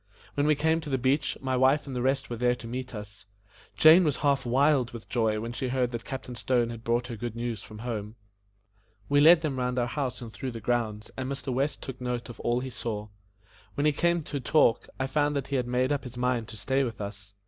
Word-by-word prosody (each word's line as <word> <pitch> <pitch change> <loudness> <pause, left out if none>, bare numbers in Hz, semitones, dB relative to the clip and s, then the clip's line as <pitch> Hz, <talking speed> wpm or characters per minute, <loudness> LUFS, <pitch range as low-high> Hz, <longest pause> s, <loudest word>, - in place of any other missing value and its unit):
When 145 +1 +1
we 155 - +5
came 160 +2 +1
to 150 - -7
the 135 - +1
beach, 135 +3 +1
my 130 -1 0
wife 130 +3 +3
and 135 -2 -6
the 125 - -1
rest 135 +2 +1
were 120 - -4
there 125 +1 +2
to 120 - -11
meet 125 +1 -5
us. 100 -1 -10 0.5
Jane 160 +4 +8
was 150 -4 +1
half 140 -3 +2
wild 130 -1 +3
with 115 -2 -9
joy 110 -3 +1
when 115 +2 -5
she 130 - -2
heard 125 -1 0
that 120 -1 -5
Captain 130 -2 -6
Stone 120 -1 +1
had 115 -1 -8
brought 120 +1 +1
her 120 - -5
good 115 +1 -5
news 115 -3 -3
from 110 - -11
home. 110 -2 -4 0.9
We 145 0 +4
led 165 +2 +8
them 145 -5 -2
round 125 0 -1
our 120 - +2
house 130 0 -3
and 115 -3 -9
through 125 +5 -5
the 115 - -5
grounds 110 -2 -1
and 130 0 -3
Mr. 135 -1 -3
West 135 +3 -1
took 130 -2 -7
note 125 -1 -3
of 120 - -10
all 120 +1 0
he 130 0 -5
saw. 105 -3 -4 0.7
When 145 - 0
we 150 - +5
came 170 +2 +1
to 145 -1 -4
talk, 125 -2 +3
I 130 - +1
found 145 +2 +1
that 140 -2 -2
he 140 - -1
had 125 -1 -1
made 125 +2 +1
up 145 - 0
his 125 -2 -9
mind 125 -2 0
to 110 - -10
stay 135 +4 +1
with 115 -4 -4
us. 100 0 -8
125 Hz, 245 wpm, -28 LUFS, 115-140 Hz, 0.9 s, Jane